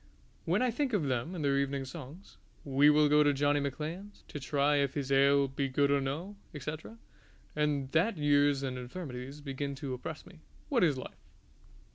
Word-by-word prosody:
When - - +2
I 250 - +2
think 260 +1 -1
of 200 -6 +2
them 130 +5 -2
and 155 -4 -3
their 140 0 +2
evening 140 -1 -1
songs 150 +6 -10 0.3
We 140 +1 +5
will 150 0 +5
go 150 +1 +5
to 145 -1 +4
Johnny 145 +1 +2
Macklean's 155 +9 -5
to 150 - -6
try 145 +1 +1
if 140 -1 0
his 140 -2 -3
ale 140 +1 +4
be 135 +1 -2
good 140 +2 +2
or 140 -1 +3
no, 160 +10 -4 0.2
etc., 155 - -6 0.6
and 145 -3 0
that 180 +5 +2
years 145 -1 +3
and 130 -1 -3
infirmities 130 0 -7
begin 140 0 -4
to 135 -1 -5
oppress 150 +5 -7
me 175 - -15 0.3
What 245 -8 +3
is 150 -6 +3
life! 130 - -10
145 Hz, 185 wpm, -31 LUFS, 135-155 Hz, 0.6 s, We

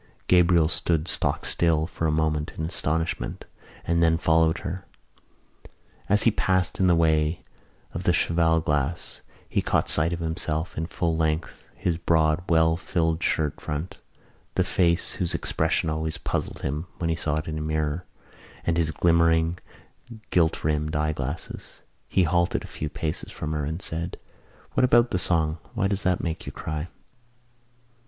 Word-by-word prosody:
Gabriel 85 -3 +5
stood 80 0 +1
stock - - -1
still 80 -2 +2
for 80 -1 -2
a - - +2
moment 75 -1 0
in 80 - -2
astonishment 80 -6 -2 0.4
and 85 0 +2
then 80 -1 +4
followed 80 +1 +3
her. 90 +2 -4 1.3
As 105 +1 +4
he 115 - +5
passed 95 -2 0
in 95 - +4
the 90 - +5
way 80 0 +2 0.5
of 85 - -3
the 90 - +3
cheval 85 -1 +2
glass 75 +1 -2 0.3
he - - 0
caught - - +1
sight 80 +2 +2
of 85 - -1
himself 80 0 -1
in 80 +1 -2
full 85 -2 -1
length, 80 0 -1
his 85 -2 -1
broad, 80 0 +2
well 80 -1 +4
filled 80 -2 0
shirt 75 -3 0
front, 75 +4 -4 0.6
the - - +3
face 85 -1 +1
whose 90 -2 -1
expression 80 0 0
always 80 0 -2
puzzled - - -3
him 75 +5 -2
when 85 -1 -1
he - - +1
saw 75 -2 -1
it 80 0 -2
in 80 -1 -3
a - - -4
mirror 75 +1 -1 0.6
and 85 0 0
his 80 -2 +2
glimmering 85 0 +3 0.7
gilt 80 -3 +2
rimmed 75 0 0
eyeglasses. 75 0 -4 0.3
He 95 - +3
halted 85 +1 +1
a - - -8
few 75 - -5
paces 80 0 -4
from 75 - -5
her 75 -2 -1
and 80 +3 -3
said: 85 +1 -3 0.6
"What - - +2
about 120 -1 +5
the 90 - +1
song? 80 -2 +1 0.2
Why 95 - +2
does 100 0 -1
that 90 -2 +1
make 80 -2 -4
you - - -4
cry?" 80 +1 -4
80 Hz, 160 wpm, -25 LUFS, 80-85 Hz, 1.3 s, Gabriel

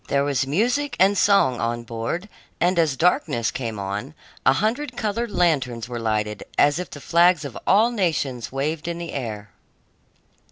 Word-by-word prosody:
There 140 0 +1
was 140 -1 0
music 245 - 0
and 195 +2 +5
song 195 -12 +3
on 120 0 -2
board, 115 - -4 0.3
and 175 +1 +2
as 155 -5 +2
darkness 150 -8 +1
came 115 -4 -4
on, 100 +9 -5 0.3
a 135 - +7
hundred 245 - -1
colored 230 +2 -1
lanterns 130 - 0
were 120 -1 -5
lighted, 105 -2 -1
as 145 +3 +4
if 180 - -5
the 145 - -9
flags 170 0 +3
of 130 -5 -7
all 220 +5 +5
nations 155 - -1
waved 150 +4 -2
in 170 0 -3
the 170 -1 -6
air. 110 -7 -5
145 Hz, 165 wpm, -23 LUFS, 120-180 Hz, 0.3 s, a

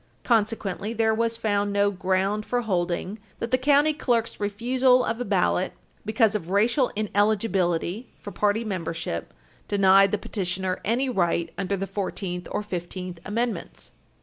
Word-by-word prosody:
Consequently, 220 -2 0
there 225 -1 +2
was 230 +1 0
found 205 -2 0
no 200 0 +2
ground 190 +2 0
for 245 +2 -1
holding 185 0 -2 0.2
that 230 - -4
the 255 - +4
county 290 +3 +4
clerk's 240 -6 0
refusal 250 +5 +2
of 225 +2 -2
a - - +1
ballot 190 -3 +1 0.3
because 220 0 +3
of 185 -5 -3
racial 230 +7 +2
ineligibility 205 -1 0
for 205 - -8
party 205 +4 +1
membership 165 - -4 0.4
denied 195 -1 +5
the 210 - +1
petitioner 190 -2 -3
any 245 +5 +1
right 170 -7 0
under 195 0 -2
the 195 - -2
Fourteenth 185 -3 -4
or - - -2
Fifteenth 180 -2 -5
Amendments. 225 -1 -3
205 Hz, 145 wpm, -25 LUFS, 190-230 Hz, 0.4 s, denied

